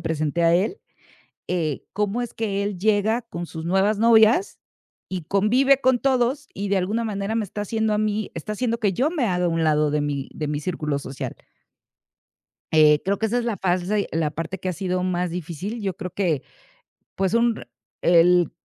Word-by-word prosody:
presenté 160 Hz, 0 st, -1 dB
a 165 Hz, 0 st, +5 dB
él?, 200 Hz, -, 0 dB, 0.7 s
eh, 160 Hz, -6 st, -1 dB
¿Cómo 210 Hz, +4 st, -1 dB
es 240 Hz, -, -5 dB
que 200 Hz, -3 st, -2 dB
él 200 Hz, -2 st, -3 dB
llega 215 Hz, +4 st, +1 dB
con 175 Hz, -6 st, -6 dB
sus 160 Hz, 0 st, -7 dB
nuevas 195 Hz, +4 st, +2 dB
novias 230 Hz, -, +4 dB, 0.5 s
y 185 Hz, -3 st, -4 dB
convive 250 Hz, -, +3 dB
con 255 Hz, -1 st, +3 dB
todos? 265 Hz, +2 st, +1 dB
Y 200 Hz, +1 st, -4 dB
de 200 Hz, -, +2 dB
alguna 210 Hz, +6 st, -1 dB
manera 205 Hz, 0 st, -2 dB
me 225 Hz, -, +1 dB
está 205 Hz, -, -8 dB
haciendo 220 Hz, +1 st, 0 dB
a -, -, +1 dB
mí 215 Hz, -1 st, -1 dB
está 170 Hz, +6 st, -4 dB
haciendo 235 Hz, +1 st, -1 dB
que 205 Hz, -5 st, +1 dB
yo 265 Hz, -, +1 dB
me 300 Hz, -8 st, 0 dB
haga 180 Hz, -3 st, 0 dB
a -, -, +2 dB
un 165 Hz, -1 st, 0 dB
lado 150 Hz, -1 st, +2 dB
de 150 Hz, -, +1 dB
mi 145 Hz, -2 st, -3 dB
de 150 Hz, -, -4 dB
mi 150 Hz, 0 st, -2 dB
círculo 150 Hz, -4 st, -2 dB
social. 135 Hz, -1 st, -6 dB, 1.4 s
Eh, 150 Hz, -1 st, +6 dB
creo 200 Hz, +1 st, 0 dB
que 220 Hz, -, +1 dB
esa 235 Hz, +3 st, 0 dB
es 240 Hz, -, -2 dB
la 230 Hz, -4 st, -1 dB
fals 180 Hz, 0 st, -1 dB
eh, 210 Hz, -1 st, +1 dB
la 160 Hz, -2 st, 0 dB
parte 165 Hz, +4 st, -5 dB
que 185 Hz, -, -4 dB
ha -, -, 0 dB
sido 180 Hz, 0 st, -2 dB
más 180 Hz, -1 st, -1 dB
difícil. 180 Hz, +6 st, -5 dB
Yo 195 Hz, -3 st, -2 dB
creo 185 Hz, -3 st, -5 dB
que 170 Hz, -9 st, 0 dB, 0.7 s
pues 190 Hz, +1 st, 0 dB
un 235 Hz, -1 st, +2 dB, 0.4 s
el 175 Hz, 0 st, +5 dB
195 Hz, 200 wpm, -23 LUFS, 170-220 Hz, 1.4 s, Eh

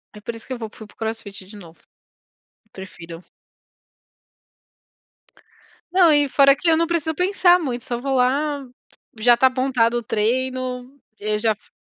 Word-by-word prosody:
É 210 Hz, -, -12 dB
por 235 Hz, -, -6 dB
isso 225 Hz, -, -10 dB
que 260 Hz, -, -4 dB
eu 245 Hz, -, -6 dB
vou 225 Hz, -, -6 dB
fui 220 Hz, -, -11 dB
para -, -, -20 dB
o -, -, -42 dB
Crossfit 220 Hz, -4 st, -5 dB
de 210 Hz, -, -13 dB
novo. 170 Hz, -4 st, -14 dB, 0.9 s
Eu 215 Hz, -, -39 dB
prefiro. 170 Hz, -2 st, -10 dB, 2.7 s
Não 360 Hz, -3 st, +5 dB
e 290 Hz, -1 st, +3 dB
fora 275 Hz, 0 st, +5 dB
que 330 Hz, +4 st, 0 dB
eu 320 Hz, -, +4 dB
não 335 Hz, 0 st, +1 dB
preciso 320 Hz, -2 st, -1 dB
pensar 360 Hz, -1 st, +3 dB
muito, 245 Hz, -7 st, -4 dB
só 240 Hz, -1 st, -4 dB
vou 270 Hz, +1 st, -2 dB
lá, 280 Hz, +3 st, +1 dB, 0.6 s
já 240 Hz, +2 st, +5 dB
tá 260 Hz, +1 st, +5 dB
montado 255 Hz, -3 st, +1 dB
o 240 Hz, -, -1 dB
treino, 255 Hz, +4 st, -2 dB, 0.2 s
eu 210 Hz, +1 st, -1 dB
já 225 Hz, 0 st, +2 dB
f 215 Hz, -, -8 dB
250 Hz, 170 wpm, -21 LUFS, 220-285 Hz, 2.7 s, Não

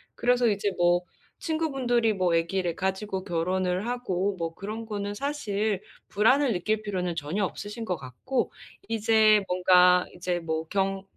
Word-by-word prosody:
그래서 245 Hz, 0 st, +2 dB
이제 205 Hz, -1 st, 0 dB
뭐 175 Hz, 0 st, +3 dB, 0.4 s
친구분들이 265 Hz, -8 st, +1 dB
뭐 180 Hz, -4 st, +1 dB
아기를 170 Hz, 0 st, -1 dB
가지고 190 Hz, +1 st, -2 dB
결혼을 180 Hz, +4 st, -1 dB
하고 205 Hz, -6 st, -1 dB
뭐 165 Hz, -1 st, -3 dB
그런 215 Hz, +5 st, -6 dB
거는 205 Hz, -1 st, -4 dB
사실 215 Hz, -7 st, -2 dB, 0.3 s
불안을 255 Hz, +6 st, +3 dB
느낄 215 Hz, +3 st, -1 dB
필요는 180 Hz, -4 st, -2 dB
전혀 165 Hz, +7 st, -2 dB
없으신 210 Hz, +4 st, -6 dB
것 180 Hz, -, -1 dB
같고. 140 Hz, -, -3 dB, 0.4 s
이제 220 Hz, -1 st, +4 dB
뭔가 180 Hz, 0 st, +5 dB
이제 180 Hz, 0 st, -2 dB
뭐 160 Hz, -1 st, -3 dB
경 195 Hz, 0 st, -1 dB
195 Hz, 290 characters per minute, -27 LUFS, 180-220 Hz, 0.4 s, 뭔가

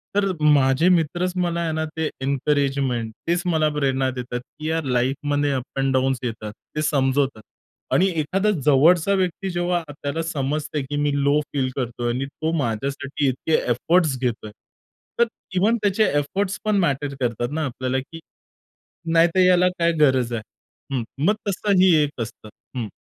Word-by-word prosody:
तर 200 Hz, -1 st, +2 dB, 0.2 s
माझे 140 Hz, +3 st, +4 dB
मित्रच 175 Hz, +1 st, +1 dB
मला 175 Hz, -2 st, 0 dB
आहे 165 Hz, -, -1 dB
ना, 160 Hz, 0 st, -1 dB
ते 160 Hz, 0 st, -3 dB
एन्करेजमेंट 135 Hz, -3 st, 0 dB, 0.2 s
तेच 170 Hz, +1 st, +1 dB
मला 160 Hz, -3 st, +2 dB
प्रेरणा 135 Hz, -1 st, +1 dB
देतात, 125 Hz, -1 st, -5 dB, 0.2 s
की 155 Hz, +1 st, -3 dB
या 165 Hz, 0 st, 0 dB
लाईफमध्ये 140 Hz, +3 st, 0 dB
अप 130 Hz, +1 st, -4 dB
एंड 135 Hz, 0 st, +1 dB
डाउन्स 130 Hz, 0 st, +1 dB
येतात, 110 Hz, -3 st, -4 dB, 0.2 s
ते 150 Hz, -, 0 dB
समजवतात. 135 Hz, -4 st, +1 dB, 0.5 s
आणि 190 Hz, -, +4 dB
एखादा 195 Hz, +7 st, +1 dB, 0.2 s
जवळचा 160 Hz, +6 st, +5 dB
व्यक्ती 190 Hz, 0 st, -1 dB
जेव्हा 175 Hz, 0 st, 0 dB
आपल्याला 145 Hz, +2 st, -4 dB
समजते, 150 Hz, -1 st, -2 dB
की 135 Hz, +2 st, -5 dB
मी 145 Hz, 0 st, +1 dB
लो 145 Hz, +1 st, +3 dB
फील 135 Hz, -3 st, 0 dB
करतोय 120 Hz, -2 st, -2 dB
आणि 130 Hz, +3 st, -2 dB
तो 155 Hz, +3 st, -4 dB
माझ्यासाठी 135 Hz, +3 st, -2 dB
इतके 130 Hz, +5 st, 0 dB, 0.2 s
एफोर्ट्स 155 Hz, +3 st, +2 dB
घेतोय. 115 Hz, -4 st, -3 dB, 0.7 s
तर 235 Hz, -, +6 dB, 0.3 s
इव्हन 210 Hz, +6 st, +3 dB
त्याचे 205 Hz, +1 st, +2 dB, 0.2 s
एफोर्ट्स 190 Hz, +7 st, -2 dB
पण 215 Hz, -1 st, +2 dB
मॅटर 145 Hz, -4 st, 0 dB
करतात 120 Hz, 0 st, -1 dB
ना 160 Hz, 0 st, -1 dB
आपल्याला, 130 Hz, 0 st, -2 dB
की 165 Hz, +5 st, -10 dB, 0.9 s
नाहीतर 170 Hz, +2 st, +4 dB
याला 180 Hz, 0 st, +5 dB
काय 170 Hz, 0 st, +3 dB
गरज 130 Hz, -4 st, +3 dB
आहे? 115 Hz, -, -2 dB, 0.5 s
हं. 125 Hz, -, -1 dB, 0.2 s
मग 210 Hz, +4 st, +4 dB
तसं 200 Hz, +1 st, 0 dB
ही 185 Hz, -2 st, +6 dB
एक 145 Hz, -4 st, -4 dB
असतं. 110 Hz, -1 st, -7 dB, 0.3 s
हं. 115 Hz, -3 st, -2 dB
145 Hz, 160 wpm, -22 LUFS, 130-170 Hz, 0.9 s, तर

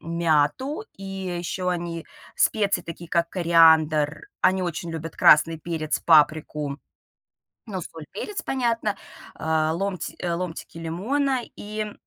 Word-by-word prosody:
мяту 170 Hz, -, 0 dB
и 195 Hz, -, -10 dB, 0.3 s
ещё 180 Hz, +1 st, -3 dB
они 170 Hz, -2 st, -3 dB, 0.3 s
специи 205 Hz, -2 st, +2 dB
такие 170 Hz, 0 st, -9 dB
как 170 Hz, -1 st, +2 dB
кориандр. 160 Hz, -, +4 dB
Они 185 Hz, 0 st, +3 dB
очень 170 Hz, -1 st, -3 dB
любят 165 Hz, 0 st, -6 dB
красный 160 Hz, +2 st, +6 dB
перец, 160 Hz, -1 st, -2 dB
паприку, 150 Hz, -2 st, +3 dB, 0.9 s
ну, 195 Hz, -4 st, -4 dB
соль, 160 Hz, -1 st, -10 dB
перец, 400 Hz, -, -4 dB
понятно, 230 Hz, -5 st, 0 dB, 0.4 s
а, 160 Hz, 0 st, 0 dB
ломт 195 Hz, +1 st, -2 dB, 0.2 s
ломтики 170 Hz, -1 st, -4 dB
лимона 250 Hz, -, 0 dB, 0.2 s
и 210 Hz, 0 st, -5 dB
170 Hz, 115 wpm, -24 LUFS, 160-200 Hz, 0.9 s, красный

